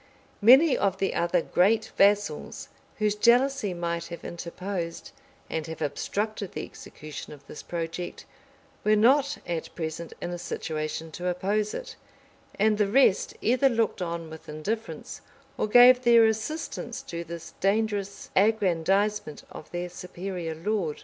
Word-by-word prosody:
Many 265 +7 +7
of 195 -1 0
the 195 - 0
other 170 0 +1
great 215 +5 +2
vassals, 200 -6 +1 0.3
whose 210 -1 +1
jealousy 240 0 +3
might 170 -1 -3
have 170 0 -9
interposed, 170 0 -5 0.4
and 160 -1 -3
have 160 - -7
obstructed 200 +7 -3
the - - -4
execution 150 -1 -10
of 145 -1 -15
this - - -9
project, 170 +1 -5 0.6
were 215 0 +4
not 275 +6 +4
at 170 -2 -4
present 165 0 -5
in 175 - -4
a 175 - -5
situation 160 -1 -4
to 180 +3 -5
oppose 205 +4 0
it; - - -7 0.6
and 215 +1 +2
the 210 - +3
rest 215 -2 +3
either 255 +4 +3
looked 225 -5 0
on 170 -2 -4
with 160 -1 -11
indifference 215 +10 -5 0.3
or - - -1
gave 245 +3 +8
their 235 -2 +6
assistance 220 +9 -3
to 170 0 -5
this 170 0 -9
dangerous 200 0 -1
aggrandizement 200 -2 +1
of - - -10
their 175 0 -4
superior 180 -1 -6
lord. 170 -2 -2
195 Hz, 140 wpm, -27 LUFS, 170-220 Hz, 0.6 s, gave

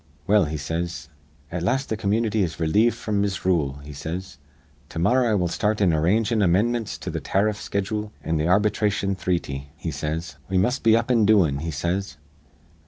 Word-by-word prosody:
'Well,' 105 -2 +4
he 75 +1 -3
says, 80 +2 -4 0.4
'at 90 0 -3
last 130 +9 0
th' - - +2
community 110 +1 +1
is 85 -4 -2
relieved 105 +9 +3
fr'm 105 -2 -1
misrule,' 85 -7 0
he 75 +1 -9
says. 85 +5 -6 0.5
'To - - -9
morrah 120 +8 +3
I 110 - +2
will 90 -3 +1
start 105 +5 0
in 95 -5 +3
arrangin' 105 +8 +2
amindmints 110 +5 +1
to - - -4
th' - - -4
tariff 100 +2 +1
schedool 105 +1 -3
an' 80 -1 0
th' 75 - +1
ar 90 +3 +5
bitration 105 -1 0
threety,' 75 -7 -2
he 80 - -4
says. 80 +1 -4
'We 95 - +1
must 125 +9 +1
be 115 0 +5
up 115 +2 -1
an' 115 -3 +4
doin',' 90 -10 +4
he 80 +3 -4
says. 85 +6 -2
95 Hz, 185 wpm, -24 LUFS, 80-105 Hz, 0.5 s, ar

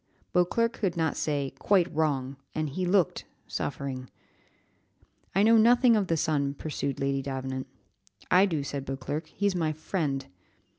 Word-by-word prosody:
Beauclerc 230 +6 +2
could 185 -4 -2
not 160 -2 +1
say, 140 -3 -1
"Quite 185 -4 +3
wrong," 140 -4 0 0.2
and 155 -1 -1
he 180 +6 -2
looked 180 -3 +2 0.2
suffering. 130 -2 -4 1.3
"I 195 - +4
know 225 +1 +6
nothing 240 +2 +6
of 205 -3 +1
the 165 - +1
son," 145 -3 0
pursued 140 -2 -3
Lady 135 0 0
Davenant. 130 -1 -4 0.6
"I 185 +2 +6
do," 160 -6 -1
said 140 -1 -4
Beauclerc, 135 +4 -4
"he 200 +5 -4
is 200 - +3
my 160 -3 0
friend." 150 -4 -2
155 Hz, 150 wpm, -28 LUFS, 140-185 Hz, 1.3 s, know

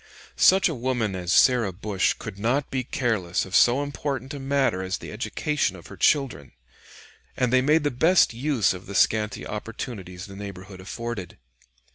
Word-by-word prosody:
] - - -25
Such 190 +1 +5
a 165 - -2
woman 120 -5 -1
as 90 -1 -3
Sarah 120 -4 +4
Bush 95 +1 0
could 95 - -8
not 125 +6 0
be 130 -1 -1
careless 110 -9 -1
of 95 +1 -5
so 125 +4 +5
important 140 -1 -4
a 145 - -6
matter 135 -8 0
as 95 0 -2
the - - -9
education 150 -1 -1
of - - -13
her - - -10
children, 130 - +1 0.8
and 125 0 +1
they 130 - +5
made 150 +4 +3
the 145 - +1
best 165 +4 +4
use 125 -4 +1
of 95 +1 -10
the 100 - -7
scanty 105 0 +1
opportunities 105 -4 -6
the 100 - -11
neighborhood 95 -1 -9
afforded. 105 -1 -6
115 Hz, 175 wpm, -25 LUFS, 95-135 Hz, 0.8 s, Such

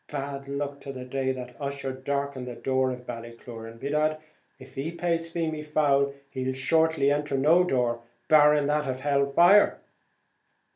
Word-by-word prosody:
Bad 140 -1 -5
luck 140 0 -4
to 135 - -7
the 130 -1 -8
day 130 +1 -1
that 125 -1 -7
Ussher 140 -1 -3
darkened 140 0 -3
the 120 - -6
door 130 +2 0
of 125 -1 -6
Ballycloran! 115 -1 -9
By 140 - -4
dad, 155 +1 +1 0.4
if - - -14
he 145 +4 -4
plays 170 -1 -1
Feemy 160 -2 -2
foul 140 -2 +1 0.2
he'll 130 -1 -2
shortly 160 +1 +2
enter 145 -1 0
no 160 +6 +5
door, 125 -7 0 0.3
barring 150 -1 +5
that 150 0 0
of 130 0 -3
hell 140 0 +2
fire!" 175 +8 +5
140 Hz, 160 wpm, -27 LUFS, 130-150 Hz, 0.4 s, no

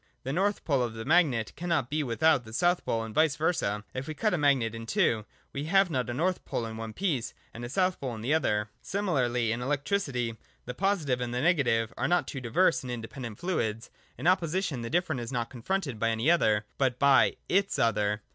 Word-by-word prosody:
The 135 - -3
north 200 +5 0
pole 140 -5 +2
of 120 -2 -2
the 115 - -6
magnet 140 -8 +2
cannot 165 -7 -1
be 155 +1 +1
without 135 +2 +2
the 110 -1 -12
south 175 +6 +2
pole, 115 0 -1
and 110 -1 -7
vice 155 +2 +3
versa. 110 - -1
If 130 +1 -5
we 155 - -5
cut 215 +6 +1
a - - +2
magnet 135 -6 +2
in 115 0 -7
two, 120 - +1 0.3
we 140 +2 -3
have 195 +2 +3
not 125 -4 -1
a - - -2
north 180 +5 0
pole 115 - -3
in 110 0 -6
one 110 0 -6
piece, 150 - -2 0.2
and 120 - -8
a 120 - -5
south 185 +5 +1
pole 130 -4 -3
in 110 - -8
the 130 +7 0
other. 105 -9 +1
Similarly, 125 - 0
in 115 +2 -2
electricity, 135 - -1 0.3
the 125 - -5
positive 155 -7 0
and 120 0 -3
the 125 - 0
negative 120 -9 +2
are - - 0
not 175 +1 +2
two 135 - -5
diverse 165 +9 +2
and 130 - -8
independent 115 -1 -6
fluids. 115 - -2 0.3
In 130 - -7
opposition, 175 -5 +1
the 115 - -4
different 160 -5 0
is 120 +1 -6
not 120 -2 -2
confronted 135 - -3
by 115 +1 +2
any 115 +8 +2
other, 110 -11 +3
but 130 -3 +1
by 140 -1 +5
iis 195 +1 +1
other. 105 -2 +1
130 Hz, 220 wpm, -28 LUFS, 115-170 Hz, 0.3 s, by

